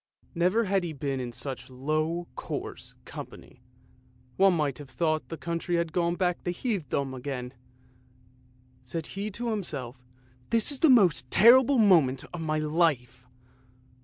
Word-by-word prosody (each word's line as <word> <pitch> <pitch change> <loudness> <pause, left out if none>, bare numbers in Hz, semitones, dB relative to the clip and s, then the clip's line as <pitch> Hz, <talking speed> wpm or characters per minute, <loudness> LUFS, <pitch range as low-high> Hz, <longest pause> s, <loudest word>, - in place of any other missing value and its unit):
Never 185 +6 +2
had 195 -2 0
he 170 -2 -4
been 135 -1 -3
in 125 -1 -4
such 135 +3 -6
low, 155 +6 -2
coarse - - -6
company; - - -11 0.7
one 195 -1 +4
might 150 -4 -1
have 145 -2 -10
thought 155 +1 -1
the 165 - -6
country 170 +1 -3
had 170 -1 -1
gone 170 -1 0
back 180 -1 -1
to - - -3
heathendom 170 - -2
again. 130 -1 -6 1.3
Said 155 +6 -5
he 200 +5 -5
to 235 +3 -4
himself, 135 - -5 0.2
" 125 0 -32
This 230 +4 +5
is 280 - -1
the 320 - +5
most 185 - +4
terrible 255 - +6
moment 165 - +4
of 175 - -5
my 155 -1 -1
life 150 -6 0
165 Hz, 150 wpm, -27 LUFS, 135-190 Hz, 1.3 s, terrible